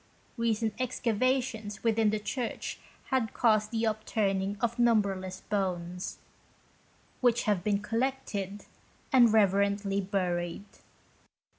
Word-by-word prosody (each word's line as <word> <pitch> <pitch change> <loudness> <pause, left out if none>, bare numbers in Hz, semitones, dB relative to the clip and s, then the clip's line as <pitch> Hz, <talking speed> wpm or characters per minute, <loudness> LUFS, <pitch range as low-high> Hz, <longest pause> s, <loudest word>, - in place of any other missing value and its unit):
Recent 225 -2 0
excavations 240 -3 -1
within 225 -1 +3
the 215 - 0
church 235 +3 -4 0.3
had 255 -5 0
caused 215 -3 +3
the 225 0 -1
upturning 205 -2 0
of 235 +2 -1
numberless 195 -5 +1
bones, 180 -3 -3 1.0
which 245 -2 +3
had 205 -5 +1
been 205 0 0
collected 215 -4 -2 0.5
and 240 -4 +7
reverently 200 -1 +2
buried. 180 -2 -2
210 Hz, 100 wpm, -30 LUFS, 195-230 Hz, 1.0 s, and